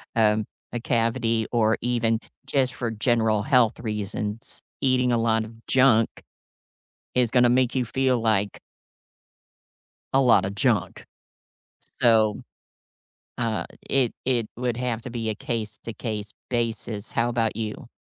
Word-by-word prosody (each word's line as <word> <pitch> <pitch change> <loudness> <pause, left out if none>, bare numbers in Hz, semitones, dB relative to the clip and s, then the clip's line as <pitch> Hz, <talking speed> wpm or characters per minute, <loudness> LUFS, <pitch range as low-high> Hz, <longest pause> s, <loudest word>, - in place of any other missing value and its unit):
um, 110 -1 +3 0.3
a 120 - -1
cavity, 115 -1 +1
or 110 -2 +3
even 115 -2 +1 0.3
just 135 -2 +1
for 115 0 -3
general 110 -1 +1
health 125 -3 +3
reasons. 105 0 -4 0.2
Eating 130 -2 +2
a - - +3
lot 115 -1 +2
of 110 - -11
junk 125 -4 +4 1.1
is 125 -2 +2
gonna 125 -1 +5
make 125 0 +2
you 130 -2 +1
feel 130 +1 +1
like 105 -3 +1 1.6
a 135 - +5
lotta 105 -7 +4
junk. 110 -1 0 0.7
So, 110 -3 +2 1.0
uh, 115 -2 -1 0.2
it 130 -4 +1
it 120 -4 +1
would 120 -1 -2
have 120 -2 -2
to 125 - -7
be 115 -2 -3
a - - -2
case-to-case 110 -1 -5 0.2
basis. 115 -3 -2
How 120 +1 +1
about 115 -2 0
you? 110 0 -5
115 Hz, 125 wpm, -25 LUFS, 110-125 Hz, 1.6 s, gonna